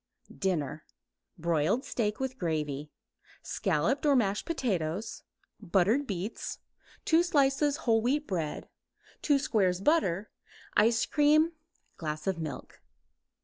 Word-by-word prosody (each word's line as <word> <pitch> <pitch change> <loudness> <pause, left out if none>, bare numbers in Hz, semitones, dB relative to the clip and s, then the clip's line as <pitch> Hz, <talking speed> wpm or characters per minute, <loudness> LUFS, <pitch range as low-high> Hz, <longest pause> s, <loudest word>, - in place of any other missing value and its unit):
DINNER 155 -6 -2 0.5
Broiled 170 - +1
steak 210 -3 -1
with 265 0 -3
gravy; 150 -4 -2 0.5
scalloped 215 - 0
or 290 -2 +4
mashed 205 -5 +1
potatoes; 200 - -2 0.4
buttered 205 +8 +2
beets; 195 +2 -4 0.5
2 325 +1 +5
slices 290 -3 +2
whole 225 -2 +4
wheat 280 +6 +1
bread; 165 - -3 0.5
2 290 -2 +3
squares 200 -10 +1
butter; 205 - +1 0.4
ice 225 +2 +4
cream; 305 +2 +4 0.5
glass 155 -2 -4
of 190 -3 -1
milk. 155 -2 -7
210 Hz, 105 wpm, -30 LUFS, 170-275 Hz, 0.5 s, 2